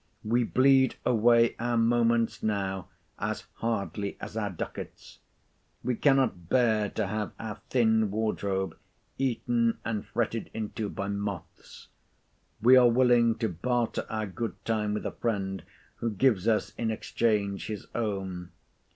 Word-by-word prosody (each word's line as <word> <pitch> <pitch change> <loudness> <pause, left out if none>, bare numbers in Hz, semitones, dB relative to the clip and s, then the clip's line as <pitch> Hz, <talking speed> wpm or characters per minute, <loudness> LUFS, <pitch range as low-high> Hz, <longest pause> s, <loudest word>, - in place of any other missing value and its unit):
We 120 +3 +2
bleed 130 +2 +4
away 115 0 +4
our 120 0 0
moments 115 0 +2
now 95 -3 -2 0.3
as - - -2
hardly 105 -3 -2
as - - -8
our 105 -2 -1
ducats. 90 - -7 0.6
We 125 - 0
cannot 130 - +2
bear 110 -5 +3
to 110 - -2
have 105 +2 -3
our 110 -2 -6
thin 110 -3 +3
wardrobe 100 -4 -1 0.4
eaten 120 -3 +1
and 110 -2 -2
fretted 115 -1 -2
into 110 -1 -3
by 100 - -4
moths. 100 -3 -6 0.8
We 130 +2 +8
are 125 -1 +7
willing 120 -1 +4
to 115 - -1
barter 120 +7 -1
our 110 -1 -2
good 110 +4 -4
time 105 -2 0
with - - -4
a - - -1
friend, 95 -4 -2 0.4
who 115 - -1
gives 110 -2 +2
us 110 -2 +1
in 115 - 0
exchange 105 -2 0
his 105 -3 -5
own. 95 -5 -3
110 Hz, 135 wpm, -28 LUFS, 100-120 Hz, 0.8 s, We